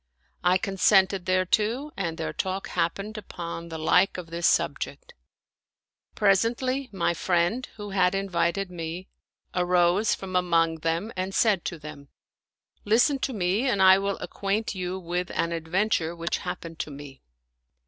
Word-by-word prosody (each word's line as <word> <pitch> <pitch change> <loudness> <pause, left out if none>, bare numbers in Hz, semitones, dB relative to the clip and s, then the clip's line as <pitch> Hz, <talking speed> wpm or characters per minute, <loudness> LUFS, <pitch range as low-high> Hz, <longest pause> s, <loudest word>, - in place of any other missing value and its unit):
I 180 +1 +4
consented 195 -1 +2
thereto 210 - +1
and 165 -4 -3
their 160 - -3
talk 190 +1 -3
happened 200 +6 -2
upon 170 -3 -7
the 160 - -5
like 180 +5 +3
of 170 -2 -8
this 170 0 +1
subject. - - -1 1.0
Presently, 240 +6 +1
my 185 -3 0
friend, 175 +8 0
who 205 -2 -7
had 185 -1 +2
invited 190 0 -1
me, 170 +1 -6 0.4
arose 180 +3 +3
from 185 -1 -7
among 165 -2 +2
them 165 +7 -2
and 185 +1 -3
said 210 -6 +3
to 170 - -3
them, 150 -2 -10 0.4
" - - -67 0.3
Listen 245 +7 +3
to 265 - -1
me 200 +6 +1
and 205 - +1
I 190 0 +7
will 200 0 -1
acquaint 205 +3 -2
you 185 -1 -3
with 180 0 -3
an 170 - 0
adventure 170 +1 0
which 170 0 -2
happened 165 -2 -6
to - - -3
me. 140 -2 -10
185 Hz, 150 wpm, -26 LUFS, 170-200 Hz, 1.0 s, I